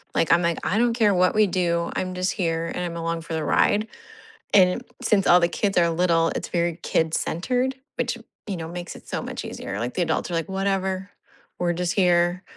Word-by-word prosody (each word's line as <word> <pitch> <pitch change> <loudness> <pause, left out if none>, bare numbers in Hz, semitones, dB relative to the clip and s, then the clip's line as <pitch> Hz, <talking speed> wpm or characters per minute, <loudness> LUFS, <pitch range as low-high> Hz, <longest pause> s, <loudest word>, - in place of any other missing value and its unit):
Like, 165 - +2
I'm 170 - +4
like, 170 -1 0
"I 205 - +1
don't 240 0 +3
care 215 -4 +3
what 180 0 +3
we 215 -1 +5
do. 170 -2 0
I'm 185 0 -2
just 185 +1 0
here, 165 -3 -1
and 180 - -2
I'm 170 -1 -4
along 165 0 -2
for 165 0 -7
the 160 -1 -1
ride." 210 +2 +2 0.7
And 185 +4 +4 0.2
since 200 -3 +2
all 175 - +7
the 170 - +4
kids 200 0 -1
are 170 -1 +4
little, 165 -1 +2
it's - - -3
very 170 -1 -1
kid-centered, 245 +11 0 0.2
which, - - -1 0.3
you 200 - -2
know, 160 -1 -5
makes 175 +1 -7
it - - -14
so - - -3
much - - -6
easier. 100 - -6
Like, 120 +3 -3
the 180 - +2
adults 160 +2 -1
are - - -1
like, 165 0 -2
"Whatever. 190 0 -1 0.5
We're 175 -1 +1
just 180 +2 -1
here." 175 -1 +2
175 Hz, 215 wpm, -24 LUFS, 170-190 Hz, 0.7 s, all